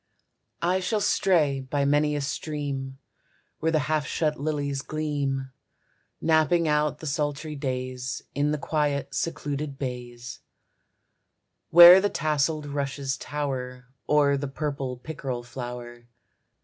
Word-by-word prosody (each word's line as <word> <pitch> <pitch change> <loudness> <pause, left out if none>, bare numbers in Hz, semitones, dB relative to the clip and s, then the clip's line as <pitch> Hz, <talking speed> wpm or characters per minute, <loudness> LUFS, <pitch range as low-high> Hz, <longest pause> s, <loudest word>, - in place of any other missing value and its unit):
I 180 +2 +2
shall 210 +4 0
stray 160 -9 +2
by 140 +2 -1
many 150 +1 +2
a 145 - -1
stream, 140 -2 -4 0.6
Where 160 +1 +1
the 160 - +3
half 155 -3 0
shut 155 -3 -1
lilies 145 -2 -2
gleam. 140 -3 -2 0.7
Napping 165 +1 +3
out 150 0 +1
the 160 - -10
sultry 150 +1 -2
days 130 -2 -4
In 145 +1 +1
the 150 - 0
quiet 145 -2 -1
secluded 145 -1 -3
bays; 125 -2 -6 1.3
Where 175 +2 +10
the 205 - +1
tasseled 155 -1 0
rushes 140 -1 -2
tower, 125 -4 -4 0.2
O'er 145 -2 +4
the 140 +1 -3
purple 140 -2 -3
pickerel 130 -3 -5
flower. 120 -1 -8
145 Hz, 120 wpm, -26 LUFS, 135-155 Hz, 1.3 s, Where